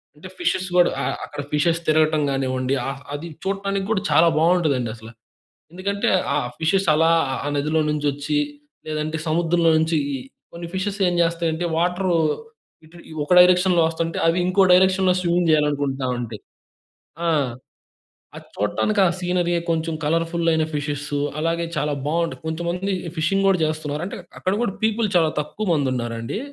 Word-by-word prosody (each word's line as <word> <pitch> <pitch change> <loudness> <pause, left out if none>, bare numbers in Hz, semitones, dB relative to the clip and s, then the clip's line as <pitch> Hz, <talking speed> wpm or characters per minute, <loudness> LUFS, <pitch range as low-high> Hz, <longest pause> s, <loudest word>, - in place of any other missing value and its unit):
అంటే - - -11
ఫిషెస్ 190 - 0
గూడా 175 -1 +5
ఆహ్, - - -1
అక్కడ - - -7
ఫిషెస్ 165 +3 +2
తిరగటం 155 0 +3
గానివ్వండీ 130 -1 -1
ఆహ్, 135 0 -4
అది 145 +4 -5 0.2
చూడటానికి 195 0 -2
గూడా 215 -3 +1
చాలా 170 - +6
బావుంటదండి 155 -8 +2
అసల. 110 0 -12 0.6
ఎందుకంటే 200 +3 -1 0.2
ఆహ్, - - +1
ఆ - - -8
ఫిషెస్ 190 +3 +1
అలా 165 +1 +4 0.3
ఆ - - -2
నదిలో 155 +3 0
నుంచొచ్చి 145 - -1 0.5
లేదంటే 155 +1 -2
సముద్రంలో 165 +1 +2
నుంచి 160 0 +1 0.2
ఈ - - -3 0.4
కొన్ని 170 0 -7
ఫిషెస్ 200 +2 -3
ఏం 175 - 0
జేస్తాయంటే 165 0 0
వాటరు 180 +2 +1 0.7
ఇటు 170 +2 -17
ఈ - - -12
ఒక 165 - +1
డైరెక్షన్‌లో 180 0 +5
వస్తంటే 165 0 -3
అవి 165 +2 +2
ఇంకో 190 +2 +3
డైరెక్షన్‌లో 185 0 +4
స్విమ్మింగ్ 175 -1 +1
జెయ్యాలనుకుంటా 145 -3 +1
ఉంటయి. 110 -4 -6 0.8
ఆ! - - +2 1.1
అది - - -11
చూడటానికి 150 - 0
ఆ 175 - +4
సీనరీ 180 -1 0 0.2
కొంచెం 165 0 0
కలర్‌ఫుల్ 165 +2 0
అయిన 160 0 +2
ఫిషెస్ 145 0 -3 0.3
అలాగే 165 +1 0
చాలా 150 0 0
బావుంటది. 165 +1 -1
కొంతమందీ 175 +4 -2 0.2
ఫిషింగ్ 195 +5 +1
గూడా 190 -3 +3
చేస్తన్నారు. 155 -1 -3
అంటే 195 - -6 0.2
అక్కడ 185 - 0
గూడా 200 -5 -1
పీపుల్ 220 0 +1
చాలా 160 -2 +3
తక్కువ 205 +8 -5
మంది 145 -4 +1
ఉన్నారండీ. 120 - -4
165 Hz, 150 wpm, -22 LUFS, 150-180 Hz, 1.1 s, చాలా